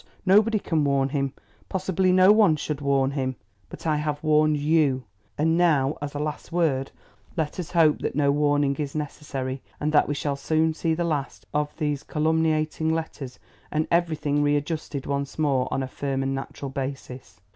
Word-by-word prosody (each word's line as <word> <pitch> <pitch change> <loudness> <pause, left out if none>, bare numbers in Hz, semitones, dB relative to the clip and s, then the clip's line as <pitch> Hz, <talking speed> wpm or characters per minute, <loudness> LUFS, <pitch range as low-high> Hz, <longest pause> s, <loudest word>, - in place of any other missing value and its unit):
Nobody 210 +3 +5
can 165 -6 0
warn 140 -1 +2
him; 140 -1 -1 0.4
possibly 190 0 +1
no 185 +2 +6
one 210 -7 +5
should 150 -1 -4
warn 135 -1 +2
him. 130 -2 -2 0.3
But - - -10
I 155 -2 +2
have 150 0 -3
warned 155 -1 +3
YOU; 145 -3 +2 0.3
and 160 +2 +2
now, 155 -5 +3
as 145 0 -5
a - - -1
last 150 0 -4
word, 150 -6 +1 0.5
let 160 +2 -2
us 175 - -4
hope 165 -4 +4
that - - -3
no 140 -1 +3
warning 145 -1 +2
is 145 -2 -4
necessary 140 -3 -4 0.2
and 150 +1 0
that 150 - +4
we 145 - -1
shall 140 0 -1
soon 160 +3 +1
see 160 0 0
the 175 - -1
last 150 -5 -3
of 150 0 0
these 150 -3 -1
calumniating 160 0 0
letters 160 -5 -4 0.3
and 155 +1 -1
everything 155 -4 +1
readjusted 145 -1 -1
once 140 0 -3
more 140 -5 +1
on 135 - 0
a - - -3
firm 135 0 -3
and 135 0 -1
natural 135 +1 -5
basis. 130 -5 -6
150 Hz, 180 wpm, -25 LUFS, 140-160 Hz, 0.5 s, no